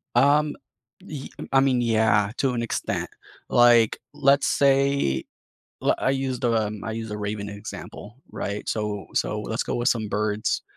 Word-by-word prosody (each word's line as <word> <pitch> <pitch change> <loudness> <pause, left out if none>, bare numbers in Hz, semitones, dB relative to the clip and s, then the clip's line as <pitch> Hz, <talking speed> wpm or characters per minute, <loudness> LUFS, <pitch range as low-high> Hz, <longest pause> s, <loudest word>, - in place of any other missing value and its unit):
Um, 145 +3 +4 0.5
y 145 -3 -7 0.2
I 135 - +5
mean, 130 -2 +3
yeah, 110 -3 +2
to 135 -2 +1
an 120 - -1
extent, 115 - -2 0.4
like, 120 -2 +5
let's 140 0 +3
say 140 - +2 0.6
li - - +3
I 130 - +1
used 135 -2 -2
a 115 -3 +2
um, 105 -1 -6
I 110 - -3
used 115 -1 -5
a 105 - -4
raven 105 0 -4
example, 105 +2 -9
right? 100 +1 -5
So 105 -2 -2
so, 105 0 0
let's 110 +2 -2
go - - -3
with 120 +1 +1
some 110 -3 0
birds, 105 +1 -1
115 Hz, 160 wpm, -24 LUFS, 105-135 Hz, 0.6 s, I